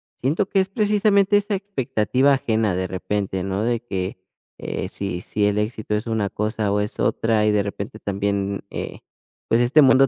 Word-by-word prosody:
siento 155 +10 0
que 195 - +2
es 190 - -2
precisamente 205 -1 +3
esa 205 0 0
expectativa 135 - +1
ajena 110 -6 +1
de 95 0 -1
repente, 95 0 -2
¿no? 95 +2 -1
De 120 0 0
que, 95 -5 -4 0.4
eh, - - -4
si 100 -3 -3
si 105 +2 -1
el 105 0 +1
éxito 105 0 -2
es 105 +2 -3
una 110 -3 0
cosa 105 0 -1
o 105 - +2
es 105 +2 -3
otra 110 -2 +2
y 105 - +4
de 105 -1 +2
repente 100 +3 -6
también, 100 0 -1
eh, - - -6 0.5
pues, 115 - +4
este 130 +6 +5
mundo 135 0 +6
110 Hz, 185 wpm, -22 LUFS, 100-135 Hz, 0.5 s, mundo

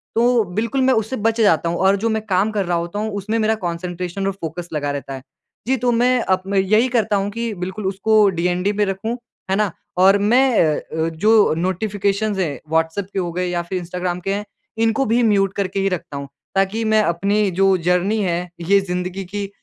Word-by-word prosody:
तो 240 0 +3
बिल्कुल 230 +7 -1
मैं 260 0 +4
उससे 220 +3 -1
बच 225 0 0
जाता 170 -6 +3
हूँ। 170 - -2
और 190 +1 +3
जो 230 +3 -1
मैं 220 0 0
काम 200 +1 +1
कर 205 -3 -1
रहा 175 0 0
होता 170 +4 -4
हूँ 215 0 -2
उसमें 215 +3 -2
मेरा 220 0 +2
कॉन्सन्ट्रेशन 175 +2 -3
और 195 - -1
फ़ोकस 175 -2 -6
लगा 145 -1 -1
रहता 140 -1 -5
है। 135 - -7 0.5
जी, 265 +1 +2
तो 245 0 +1
मैं 245 +2 +3
अब 185 -3 +1
मैं 200 0 +1
यही 215 +6 +3
करता 215 -1 +1
हूँ 200 0 0
कि 230 +1 -3
बिल्कुल 190 +2 -5
उसको 205 +2 +3
डीएनडी 180 +3 0
में 210 0 +1
रखूँ। 195 +5 -3 0.3
है - - +3
ना? 210 -2 +1 0.3
और 195 +2 +6
मैं 240 +4 +3
अ 155 -1 +1
अ, 160 +1 -3
जो 210 +4 +3
नोटिफ़िकेशन 200 +3 -1
हैं 150 -8 -2
व्हाट्सएप 160 +4 0
के - - -1
हो 175 -2 -2
गए 180 +2 -2
या 175 -1 -1
फिर 180 +2 -4
इंस्टाग्राम 180 0 -3
के 195 +2 -2
हैं 205 +1 -3 0.4
इनको 225 +4 +2
भी 235 +1 +2
म्यूट 195 -3 +2
करके 195 0 -2
ही 195 0 +1
रखता 170 -5 -5
हूँ। 140 0 -6 0.3
ताकि 195 +4 +1
मैं 220 0 +4
अपनी 200 +3 +1
जो 195 0 +5
जर्नी 180 +5 +1
है 175 0 -1 0.2
ये 200 0 +6
ज़िंदगी 180 +1 -4
की 200 +2 -5
195 Hz, 215 wpm, -20 LUFS, 180-215 Hz, 0.5 s, और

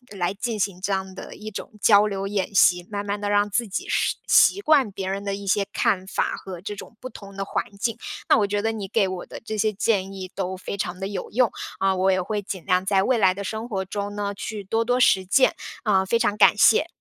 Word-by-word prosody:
来 180 0 -1
进 220 +1 -3
行 190 -2 -1
这 200 - -2
样 190 0 -3
的 - - -9
一 215 +1 -8
种 200 - -7
交 210 -1 +6
流 195 -1 -3
演 200 0 -2
习， 180 -2 +4
慢 205 0 -3
慢 205 0 -2
地 205 0 -2
让 205 0 +2
自 235 +2 0
己 190 - -4
适 - - +1
习 400 - +5
惯 285 - +3
别 190 -1 -5
人 195 +1 -3
的 200 -1 -2
一 200 0 -8
些 200 +1 +2
看 185 -1 +1
法 - - -1
和 185 -3 -9
这 205 +1 -5
种 215 - -11
不 255 - -6
同 200 -2 -12
的 195 - -2
环 - - -1 0.2
境。 230 0 -1 0.3
那 - - +6
我 205 -2 +2
觉 205 0 -1
得 225 +1 0
你 205 -3 -5
给 200 -1 +2
我 185 -1 -5
的 - - -9
这 220 -1 -4
些 215 +1 +2
建 195 -2 0
议 185 -1 -7
都 190 -1 -3
非 195 - -6
常 180 -1 -4
地 195 - -3
有 200 - -5
用， 245 +1 +2 0.3
啊， 195 -1 +2
我 190 +1 +2
也 185 0 +1
会 205 +3 -3
尽 190 -3 -7
量 185 +1 +2
在 195 -1 +3
未 250 +3 +2
来 185 -3 +4
的 200 +1 -6
生 220 +4 -4
活 190 -3 -2
中 205 +1 -4
呢， 205 -1 -2
去 210 +1 -6
多 225 +4 0
多 245 +1 +1
实 190 -6 +4
践。 255 +8 +3 0.3
啊， 190 -4 +2
非 230 +5 +2
常 210 -3 +1
感 205 - +6
谢。 230 +10 +5
200 Hz, 275 characters per minute, -24 LUFS, 190-215 Hz, 0.3 s, 交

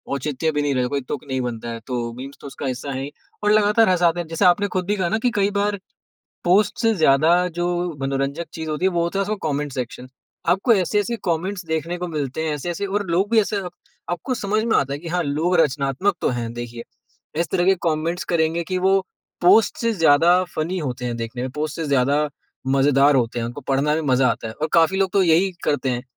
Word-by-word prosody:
औचित्य 150 +3 -1
भी 150 -1 -1
नहीं 145 -1 0
रहे 125 -1 +1
कोई 140 +1 -2
तुक 130 +3 -5
नहीं 130 -1 -2
बनता 120 -1 -4
है 115 0 -5
तो 125 - -3 0.2
मीम्स 135 +3 -9
तो - - -8
उसका 135 +1 -7
हिस्सा 130 +2 -3
है 135 0 -3
ही, 140 +2 -5 0.3
और 210 - +3
लगातार 210 0 +4
हसाते 175 -1 +2
हैं। 170 - -4
जैसे 165 +4 0
आपने 205 +3 +4
खुद 185 - 0
भी 205 +3 0
कहा 180 -2 0
ना 220 - +1
कि - - +5
कई 200 -1 +2
बार 205 0 0 0.7
पोस्ट 205 +6 +3
से 225 - +4
ज़्यादा 155 -2 +4 0.2
जो 175 0 -2
मनोरंजक 135 +4 -2
चीज़ 160 -1 -6
होती 155 +4 -2
है 190 - +4
वो 170 -1 +1
होता 170 +3 -2
है - - +2
उसका 210 +2 -1
कमेंट 145 0 -2
सेक्शन। 125 0 -5 0.4
आपको 195 +7 +3
ऐसे-ऐसे 210 +3 +1
कमेंट्स 180 +2 -2
देखने 160 +2 -2
को 180 - -4
मिलते 150 -1 -3
हैं 155 - -1
ऐसे-ऐसे 175 +7 -3
और 205 +1 -2
लोग 190 +5 +1
भी 230 - +4
ऐसे 210 0 -2 0.5
आपको 250 +9 -2
समझ 215 -1 0
में 230 - +2
आता 140 0 0
है 140 - -3
कि 165 - -8
हाँ, 175 +1 0
लोग 160 +5 0
रचनात्मक 140 +5 +1
तो - - +1
हैं 120 -2 -3
देखिए। 120 0 -6 0.6
इस 170 - 0
तरह 175 - +1
के 190 +1 +5
कमेंट्स 165 +2 -1
करेंगे 165 0 +1
कि 185 +2 -2
वो 190 +1 +3 0.4
पोस्ट 195 +5 +5
से 230 -1 +1
ज़्यादा 170 0 +4
फनी 170 +4 -1
होते 125 -6 -4
हैं 120 -1 -2
देखने 115 +2 -5
में, 130 - -3
पोस्ट 150 +3 -4
से 165 - -3
ज़्यादा 140 +3 +2 0.4
मज़ेदार 140 +1 +4
होते 120 -1 0
हैं 115 - -2
उनको 120 - -7
पढ़ना 140 +3 +1
भी 160 - 0
मज़ा 125 0 +4
आता 110 - -2
है 110 - -8
और 155 +5 -2
काफ़ी 170 +3 +4
लोग 190 -1 +1
तो 195 - +4
यही 175 +3 +3
करते 140 -2 0
हैं। 120 0 -2
160 Hz, 230 wpm, -22 LUFS, 135-185 Hz, 0.7 s, कि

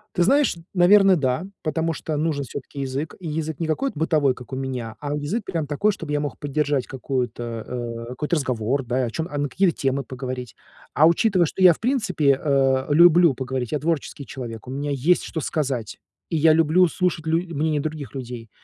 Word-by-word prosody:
Ты 175 - +3
знаешь, 275 +1 +3 0.2
наверно, 195 +1 +6
да. 130 +4 0 0.2
Потому 165 +1 -1
что 155 -1 -4
нужен 150 -2 -1
всё-таки 140 +2 -8
язык. 135 +3 -3
И 175 - -7
язык 155 0 -3
не 165 - -1
какой-то 160 - -2
бытовой, 150 -5 +2
как 125 +1 -12
у - - -1
меня, 130 -4 -4
а 145 0 -3
язык 150 +10 -2
прям 160 -4 -3
такой, 200 +9 +1
чтобы 165 -7 -6
я 145 - +1
мог 145 -3 -5
поддержать 145 -2 -1
какую-то, 130 -2 -3 0.2
э, 115 -1 -5
какой-то 150 +6 -1
разговор, 130 0 -1
да, 125 +1 0
о - - -3
чём 160 +5 -3
а, 145 - -5
на 145 -1 -1
какие 190 +4 +2
темы 135 -1 -1
поговорить. 125 -2 -6 0.4
А 155 - +5
учитывая, 180 +1 +3
что 190 - -5
я, 180 -2 +8
в - - -16
принципе, 215 - +1
э, 135 -2 +2
люблю 170 -1 +6
поговорить, 130 0 -4
я- 150 - 0
творческий 150 -2 -2
человек, 120 -3 -8
у - - -6
меня 145 +1 -3
есть, 145 +7 +2
что 160 - -4
сказать, 135 -8 -2 0.3
и 165 - 0
я 155 +1 +5
люблю 165 +3 +4
слушать 175 -2 -1
лю 165 +1 +3 0.2
мнение 150 0 0
других 150 -3 -5
людей, 120 -3 -7
145 Hz, 200 wpm, -23 LUFS, 130-165 Hz, 0.4 s, я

